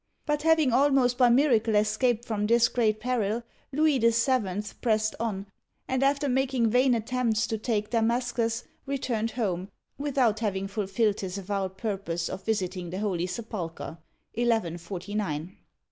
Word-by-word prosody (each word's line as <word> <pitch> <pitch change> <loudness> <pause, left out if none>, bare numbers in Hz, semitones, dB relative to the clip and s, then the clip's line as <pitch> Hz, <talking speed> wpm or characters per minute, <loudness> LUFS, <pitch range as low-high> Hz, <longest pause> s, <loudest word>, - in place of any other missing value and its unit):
But, 295 0 0
having 315 -5 +3
almost 265 -2 +4
by 250 -1 +6
miracle 235 -4 +3
escaped 220 +3 +2
from 210 -3 -1
this 235 +1 +4
great 215 -3 +1
peril, 230 -1 -1 0.3
Louis 300 -1 +3
VII. 230 -4 +2 0.2
pressed 215 -2 +1
on, 205 -4 -2 0.4
and 260 0 0
after 280 +1 +2
making 260 -3 +1
vain 250 +1 +4
attempts 230 -1 0
to 220 - -3
take 215 -2 -1
Damas'cus, 235 0 0 0.2
returned 245 -5 -1
home, 195 -5 -2 0.3
without 260 -7 +1
having 195 -3 -1
fulfilled 205 +1 0
his 190 0 -4
avowed 195 -1 -3
purpose 190 -6 -3
of 190 - -6
visiting 185 -4 -2
the 185 - -5
Holy 185 -4 -1
Sepulcher 180 -6 -6 0.3
(1149). 185 -5 -2
225 Hz, 135 wpm, -27 LUFS, 200-250 Hz, 0.4 s, by